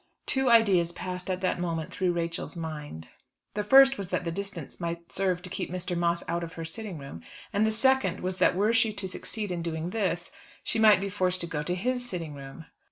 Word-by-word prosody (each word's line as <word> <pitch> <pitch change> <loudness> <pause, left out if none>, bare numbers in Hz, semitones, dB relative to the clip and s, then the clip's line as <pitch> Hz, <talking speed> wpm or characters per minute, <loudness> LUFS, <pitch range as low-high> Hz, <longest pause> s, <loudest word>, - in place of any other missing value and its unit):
Two 265 -2 +1
ideas 195 -7 +5
passed 180 +1 -5
at 185 0 -1
that 185 -1 0
moment 165 -3 -2
through 185 -1 +1
Rachel's 170 0 -3
mind. 150 - -6 0.4
The 210 - -1
first 270 +3 +7
was 195 -2 -4
that 180 0 -1
the 170 - -2
distance 195 -4 -5
might 170 -1 -4
serve 185 -2 0
to 180 - -7
keep - - -3
Mr. 180 0 -3
Moss 170 0 +1
out 170 0 -1
of 165 -1 -6
her 165 - -5
sitting 195 +1 -5
room, 140 - -9 0.3
and 210 +2 +3
the - - +2
second 265 +4 +2
was 185 +1 -3
that 180 - +4
were 210 +4 +3
she 225 -2 +3
to 200 -2 -4
succeed 205 +2 -3
in 175 -1 -2
doing 165 +1 -3
this, 185 -5 -1 0.3
she - - -1
might 215 -3 +7
be 200 - -2
forced 185 -2 0
to - - -2
go 165 -3 -3
to 175 +4 -1
his 245 +6 -1
sitting 170 -10 -4
room. 140 +3 -10
180 Hz, 225 wpm, -28 LUFS, 170-205 Hz, 0.4 s, first